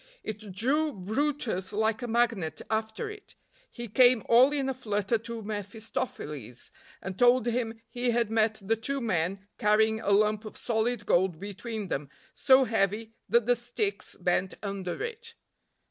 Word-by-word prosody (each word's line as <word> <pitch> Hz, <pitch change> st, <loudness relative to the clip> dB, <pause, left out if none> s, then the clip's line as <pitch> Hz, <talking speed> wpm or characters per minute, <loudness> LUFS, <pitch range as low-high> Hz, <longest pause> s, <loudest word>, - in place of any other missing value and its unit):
It 215 Hz, -1 st, -6 dB
drew 275 Hz, +11 st, +1 dB
brutus 220 Hz, -2 st, -1 dB
like 220 Hz, +2 st, 0 dB
a 245 Hz, -, -3 dB
magnet 225 Hz, -9 st, 0 dB
after 220 Hz, -, -1 dB
it. 420 Hz, -1 st, -13 dB, 0.3 s
He 240 Hz, -1 st, -7 dB
came 245 Hz, +1 st, +5 dB
all 250 Hz, +4 st, +6 dB
in 280 Hz, -2 st, -1 dB
a 265 Hz, -, 0 dB
flutter 215 Hz, -3 st, -1 dB
to 230 Hz, 0 st, -6 dB
mephistopheles, 205 Hz, -, -5 dB, 0.3 s
and 190 Hz, 0 st, -6 dB
told 245 Hz, 0 st, +5 dB
him 230 Hz, -2 st, -1 dB
he 245 Hz, 0 st, -2 dB
had 235 Hz, -2 st, +1 dB
met 220 Hz, -1 st, +2 dB
the 220 Hz, +4 st, +1 dB
two 275 Hz, +5 st, 0 dB
men 195 Hz, -3 st, -1 dB
carrying 220 Hz, 0 st, +3 dB
a 205 Hz, -, -2 dB
lump 210 Hz, +1 st, +3 dB
of 215 Hz, -, -8 dB
solid 230 Hz, -1 st, -1 dB
gold 175 Hz, -3 st, +2 dB
between 205 Hz, +1 st, -5 dB
them 140 Hz, 0 st, -3 dB, 0.2 s
so 265 Hz, 0 st, +5 dB
heavy 220 Hz, -1 st, 0 dB, 0.2 s
that 235 Hz, -2 st, +4 dB
the 245 Hz, +1 st, +4 dB
sticks 245 Hz, -, -3 dB
bent 180 Hz, +1 st, 0 dB
under 195 Hz, -, -4 dB
it. 465 Hz, 0 st, -6 dB
220 Hz, 155 wpm, -28 LUFS, 200-245 Hz, 0.3 s, all